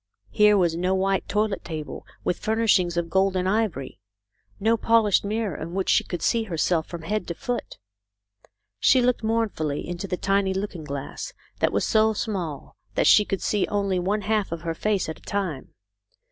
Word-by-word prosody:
Here 210 -1 +5
was 170 -3 +2
no 180 +2 +1
white 195 0 0
toilet 210 -1 0
table 155 -3 -6 0.2
with 175 - -1
furnishings 210 -6 +2
of 170 -1 0
gold 190 0 +2
and 185 0 0
ivory; 195 - -1 0.6
no 225 +3 +3
polished 225 -3 +3
mirror 210 -3 -2
in 165 +4 -6
which 195 -1 -1
she - - +4
could 175 - -5
see 230 - +2
herself 165 -3 0
from 170 -2 -7
head 210 +2 -2
to 170 - -4
foot. 245 +6 -4 1.0
She 260 - +5
looked 250 0 +2
mournfully 220 -10 -1
into 175 +3 -4
the 180 - -2
tiny 195 0 +1
looking 190 -5 -4
glass 140 - -6 0.3
that - - +2
was - - +1
so 220 -1 +3
small 185 - -4 0.2
that - - +2
she 210 - +7
could 195 - -3
see 205 -2 +1
only 200 -3 0
one 200 +4 0
half 210 -2 0
of 170 -1 -4
her 165 -1 -2
face 205 +3 0
at 160 - -6
a - - -26
time. 185 -9 -4
195 Hz, 185 wpm, -25 LUFS, 170-215 Hz, 1.0 s, she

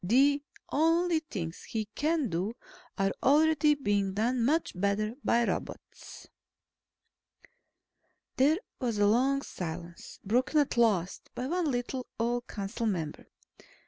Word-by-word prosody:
The 275 +9 +4 0.3
only 330 +2 +3
things 180 - -6
he 220 -1 -3
can 310 -2 +1
do, 185 +7 -2 0.4
are 195 0 +2
already 300 +1 +4
being 205 -7 0
done 235 +3 +1
much 310 +7 +1
better 200 +3 0
by 235 0 +3
robots." - - -6 2.1
There 290 +5 +4 0.2
was 235 -5 -1
a 205 - +4
long 265 +6 +3
silence, 170 0 -7
broken 255 +8 +1
at 285 - +1
last 205 -7 +1
by 250 - -3
one 340 +2 0
little, 250 0 -3
old 240 +1 -1
council 210 +3 -3
member. 165 -7 -3
240 Hz, 120 wpm, -30 LUFS, 200-285 Hz, 2.1 s, The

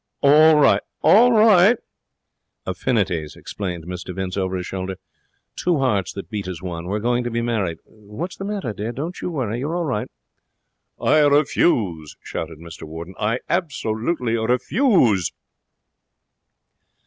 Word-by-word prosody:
'All 155 +3 +6
right! 150 - +4 0.2
All 240 +4 +6
right!' 215 -1 +6 0.9
'Affinities,' 95 - -1
explained 90 -5 -6
Mr 90 0 -6
Vince 95 -1 -3
over 95 -1 -1
his 90 -1 -3
shoulder. 95 0 -4 0.6
'Two 175 -2 +1
hearts 105 -9 0
that 100 +3 -8
beat 100 -3 -4
as 90 -3 -5
one. 85 -2 -6
We're 100 +3 -1
going 120 +3 0
to 120 - -2
be 115 0 -2
married. 100 -8 -1
What's 110 - -8
the - - -7
matter, 200 - -3
dear? 105 +4 -4
Don't 160 +8 -5
you - - -3
worry; 120 -8 -2
you're 150 +6 -3
all 175 -1 -1
right.' 120 -8 -2 0.9
'I 155 - +3
refuse!' 110 - +1
shouted 80 -1 -5
Mr 85 0 -11
Warden. 80 +3 -8
'I 115 +4 0
absolutely 125 -6 -1
refuse.' 125 - +2
110 Hz, 140 wpm, -22 LUFS, 95-150 Hz, 0.9 s, All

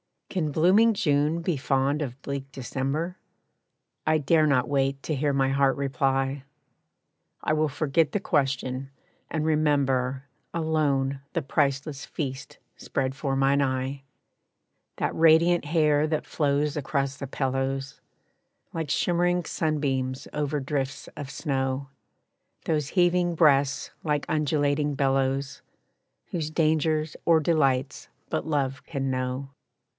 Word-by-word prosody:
Can 160 -6 -1
blooming 190 +9 +5
June 155 -4 +1
be 165 -2 -1
fond 135 +2 +1
of 130 -2 -4
bleak 140 0 -5
December? 140 +7 -3 0.9
I 155 0 +4
dare 155 +1 +3
not 130 -3 +2
wait 135 -1 0
to 155 - -2
hear 145 0 0
my 135 -1 +2
heart 135 0 +3
reply. 135 0 0 1.0
I - - 0
will 155 0 +2
forget 150 +2 +1
the 205 - +1
question 135 -5 -1 0.4
and 155 -1 -1
remember 135 -4 +1 0.3
Alone 145 -4 0
the 165 - 0
priceless 140 0 -1
feast 135 -4 -5 0.2
spread 130 0 -2
for 135 0 -2
mine 135 +1 +3
eye, 135 0 -1 0.9
That - - -1
radiant 165 +1 +4
hair 150 -1 +3
that 155 -1 -1
flows 145 -1 0
across 140 -1 -1
the 140 - -5
pillows, 135 0 -2 0.7
Like 160 -3 -3
shimmering 175 +3 +1
sunbeams 135 -5 -1
over 150 0 -1
drifts 135 0 -3
of 145 -2 -6
snow; 135 -2 -2 0.8
Those 150 -4 0
heaving 175 +1 +2
breasts, 140 -3 +3
like 150 -2 0
undulating 145 -1 +1
billows, 135 0 0 0.7
Whose 160 -3 -3
dangers 155 -1 +1
or 165 -1 +5
delights 140 -4 +1 0.2
but - - -2
Love 140 -3 -1
can 135 -3 -2
know. 130 +1 -3
140 Hz, 120 wpm, -26 LUFS, 135-155 Hz, 1.0 s, blooming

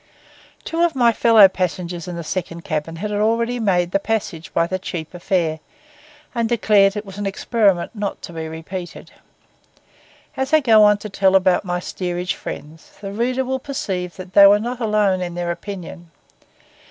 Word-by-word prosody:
Two 330 +1 -2
of 345 -3 +2
my 240 -3 +4
fellow 225 -2 +7
passengers 180 -2 -3
in 175 - -5
the 170 - -5
second 170 0 -4
cabin 155 +1 -3
had 210 +5 -4
already 230 +4 0
made 180 -5 +1
the 195 - +2
passage 195 -6 -3
by 165 - +2
the 185 +2 -3
cheaper 175 -1 -6
fare, 170 -4 0 0.7
and 230 -2 -1
declared 210 -4 +3
it 210 0 -4
was 195 0 -10
an 205 - -2
experiment 195 -2 +1
not 205 -3 -4
to 175 - -8
be 160 -1 -5
repeated. 170 +3 -8 1.2
As 265 +2 -3
I 310 - +7
go 225 -6 +5
on 210 0 +5
to 210 +1 -8
tell 195 -1 +2
about 185 0 +3
my 180 -1 -2
steerage 180 0 -3
friends, 155 +2 -9
the 195 -1 -6
reader 250 +5 -1
will 265 +1 -2
perceive 190 -10 -4
that 185 0 -10
they 200 -1 +9
were 205 +1 +6
not 240 +3 -4
alone 210 -4 +1
in 175 -1 -4
their 175 -1 -2
opinion. 175 -2 -8
195 Hz, 180 wpm, -20 LUFS, 175-220 Hz, 1.2 s, they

